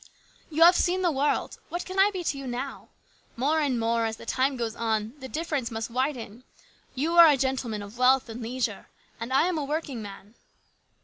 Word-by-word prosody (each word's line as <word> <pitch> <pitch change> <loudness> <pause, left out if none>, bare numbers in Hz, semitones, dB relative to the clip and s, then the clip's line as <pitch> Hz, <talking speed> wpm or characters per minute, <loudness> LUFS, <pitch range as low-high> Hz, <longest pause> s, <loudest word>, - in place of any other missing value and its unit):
" - - -31
You 320 +1 +3
have 350 +2 +8
seen 365 +2 +1
the 350 - +3
world. 285 +1 -1
What 350 - -4
can 375 +1 -4
I 395 +2 +6
be 375 -3 -5
to 300 - -1
you 275 -1 -7
now? 250 +3 -5 0.5
More 290 +6 +1
and 275 -6 0
more, 230 0 +1
as 220 0 -5
the - - -11
time 265 +2 0
goes 230 -2 -3
on, 220 -1 -1
the 260 -1 -8
difference 300 -6 -2
must 225 0 -5
widen. 250 -3 -3 0.5
You 320 +6 0
are 335 - +11
a 290 -3 +5
gentleman 255 -5 -2
of 205 +4 -11
wealth 255 +1 +4
and 230 +1 -7
leisure, 230 -2 -3 0.3
and 230 +2 -5
I 270 +3 +4
am 355 -3 0
a - - -2
working 285 -4 -3
man." 200 0 -10
260 Hz, 210 wpm, -27 LUFS, 230-305 Hz, 0.5 s, are